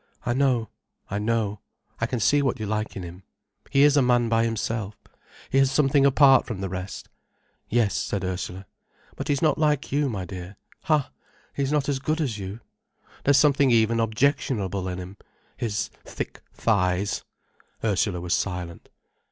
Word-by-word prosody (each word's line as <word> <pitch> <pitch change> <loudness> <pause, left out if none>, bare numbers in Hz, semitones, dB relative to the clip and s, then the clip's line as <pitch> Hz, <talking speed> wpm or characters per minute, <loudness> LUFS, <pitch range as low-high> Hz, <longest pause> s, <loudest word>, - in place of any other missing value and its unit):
"I 120 - +1
know—I 120 -6 -2
know. 105 -1 0 0.4
I - - 0
can 125 - -2
see 145 +6 +3
what 130 -3 0
you 110 - -3
like 105 +1 -2
in 95 - -5
him. 90 +2 -9 0.5
He 140 0 +4
is 145 0 +6
a 145 - +5
man 120 -2 +3
by 115 0 +3
himself, 110 -2 -2 0.6
he 135 - +4
has 135 -1 +4
something 140 0 +4
apart 135 -1 +5
from 115 -6 -4
the 95 -1 -3
rest." 95 +1 -6 0.6
"Yes," 115 -3 +2
said 100 - -2
Ursula. 95 +1 -4 0.5
"But - - -5
he's 140 0 0
not 155 -1 +3
like 150 -2 +1
you, 145 0 +1
my 100 -6 -4
dear—ha, 100 - -3 0.4
he's 140 0 -1
not 150 -2 +1
as 140 -2 0
good 155 +4 -1
as 125 -9 -1
you. 100 +4 -6 0.6
There's 140 0 +5
something 140 -1 +4
even 115 -1 +3
objectionable 110 -5 0
in 90 -1 -3
him—his 100 +3 -6
thick - - -6
thighs—" 100 -2 0 0.6
Ursula 100 -3 +1
was 90 0 -1
silent. 90 -3 -3
115 Hz, 160 wpm, -25 LUFS, 100-135 Hz, 0.6 s, is